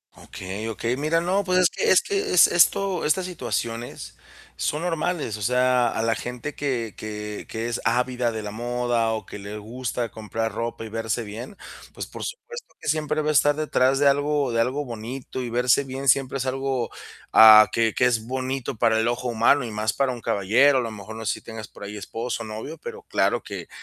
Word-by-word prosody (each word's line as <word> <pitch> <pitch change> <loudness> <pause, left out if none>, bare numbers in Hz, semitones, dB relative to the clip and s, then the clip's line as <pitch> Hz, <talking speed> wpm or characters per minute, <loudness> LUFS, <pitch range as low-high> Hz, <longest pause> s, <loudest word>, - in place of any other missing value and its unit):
Okey, 95 +4 -7
okey. 115 +2 -2
Mira, 155 +4 +1
no, 190 +4 +1
pues 185 -1 +1
es 180 -1 +5
que 455 - 0
es - - +6
que 405 0 -1
es - - +9
esto 185 +1 +3
estas 180 +5 +1
situaciones 120 -8 -4 0.4
son 150 +3 -2
normales, 170 -7 -1
o - - -10
sea, 125 +2 +3
a 110 - -2
la 115 0 +2
gente 125 +5 -5
que 120 -7 -2
que 105 -1 -6
que 115 +1 -3
es 120 - -3
ávida 125 +1 +1
de 110 -1 -5
la 105 - -5
moda, 120 0 -1
o 110 - -4
que - - -9
le 100 +1 -7
gusta 115 +1 -4
comprar 110 +1 -3
ropa 115 +1 -4
y - - -8
verse 115 +1 -2
bien, 115 - -8 0.4
pues, - - -5
por - - -9
supuesto - - -8
que - - -9
siempre 155 0 0
va 150 - 0
a - - +4
estar 145 0 +4
detrás 135 -3 +2
de 145 - +4
algo 145 -1 +2
de 115 - +2
algo 135 +5 -1
bonito 120 +3 -6
y 120 - -4
verse 125 +3 +3
bien 135 +1 -6
siempre 135 +1 +3
es 135 - -3
algo, 130 -2 -2 0.4
ah, 110 -1 +9
que 115 -1 +1
que 125 - +3
es 115 -3 +1
bonito 130 0 -3
para 110 -1 +3
el 110 - +1
ojo 120 +1 -1
humano 120 +4 +3
y 115 - -6
más 105 0 -1
para 135 -2 +1
un 120 -2 -7
caballero. 115 +10 +3
A 130 - +2
lo 115 - -4
mejor 110 +1 -9
no 110 0 -7
sé 110 - +1
si - - -9
tengas 110 -1 -8
por - - -13
ahí 105 +1 -6
esposo, 115 +3 -4
novio, 110 +8 -7
pero 465 -1 -8
claro 430 - 0
que - - -7
120 Hz, 215 wpm, -24 LUFS, 110-140 Hz, 0.4 s, es